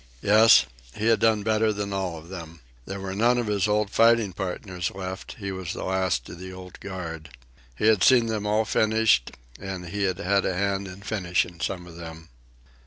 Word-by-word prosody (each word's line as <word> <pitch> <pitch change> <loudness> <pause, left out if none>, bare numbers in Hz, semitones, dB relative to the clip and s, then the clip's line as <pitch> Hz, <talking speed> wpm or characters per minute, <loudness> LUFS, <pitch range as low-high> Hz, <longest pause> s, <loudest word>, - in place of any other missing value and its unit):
Yes, 105 - +7 0.3
he 110 +2 0
had 115 - +4
done 110 -2 +3
better 110 0 +2
than 100 -1 -4
all 95 -4 -2
of 80 +2 -12
them. 85 -3 -9 0.3
There 95 0 -5
were 95 0 -5
none 120 +5 +3
of 120 - 0
his 105 -1 0
old 105 -1 +1
fighting 115 -3 +4
partners 90 -1 -4
left. 95 +1 -7
He 100 -2 -5
was 95 -2 -5
the - - -6
last 95 -9 0
of 85 - -10
the 95 0 -8
old 95 -1 -11
guard. 80 -5 -7 0.5
He 60 - -2
had 110 -4 +4
seen 125 -3 +6
them 110 -2 -2
all 105 +1 +2
finished, 110 - +2 0.3
and 95 -3 -6
he 100 +3 -4
had 95 -2 -1
had 100 0 +1
a 90 - -1
hand 100 0 -1
in 95 +2 -10
finishing 90 -4 -1
some 90 -1 -3
of 85 -1 -12
them. 80 -1 -10
95 Hz, 200 wpm, -25 LUFS, 90-105 Hz, 0.5 s, Yes